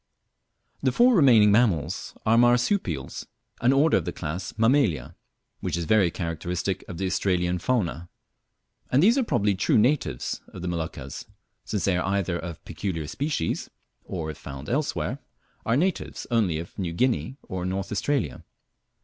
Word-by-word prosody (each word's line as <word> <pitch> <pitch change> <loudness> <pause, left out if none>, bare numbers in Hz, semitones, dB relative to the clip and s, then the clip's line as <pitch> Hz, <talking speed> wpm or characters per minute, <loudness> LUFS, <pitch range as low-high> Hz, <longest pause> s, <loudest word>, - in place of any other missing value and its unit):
The 130 - +2
four 245 - +5
remaining 120 - +6
mammals 95 -7 +1
are 110 +1 +4
Marsupials, 120 - +1 0.3
an 125 - +4
order 145 +4 +4
of - - -2
the 90 - -2
class 85 +2 -5
Mammalia, 115 - +2 0.4
which - - -2
is 85 - -2
very 100 -1 +4
characteristic 90 +2 -3
of 85 - -7
the 95 - -2
Australian 90 -1 0
fauna; 85 -6 -1 0.8
and 135 +5 +4
these 225 +5 +6
are - - +2
probably 105 - +1
true 95 - +2
natives 110 - +1
of 90 - -10
the - - -3
Moluccas, 80 -6 -5 0.4
since 105 - -2
they 95 -2 +2
are 90 - -1
either 95 -3 0
of 85 -2 -8
peculiar 85 -6 -3
species, 135 - -2 0.3
or 80 -4 -4
if 75 - -12
found 70 0 -8
elsewhere 140 0 -1 0.5
are 115 +2 +3
natives 185 +5 -1
only 105 -9 +2
of 85 +5 -8
New 85 -3 -2
Guinea 130 +5 0
or 95 -1 -5
North 95 +1 -3
Australia. 105 - -1
95 Hz, 155 wpm, -26 LUFS, 85-125 Hz, 0.8 s, remaining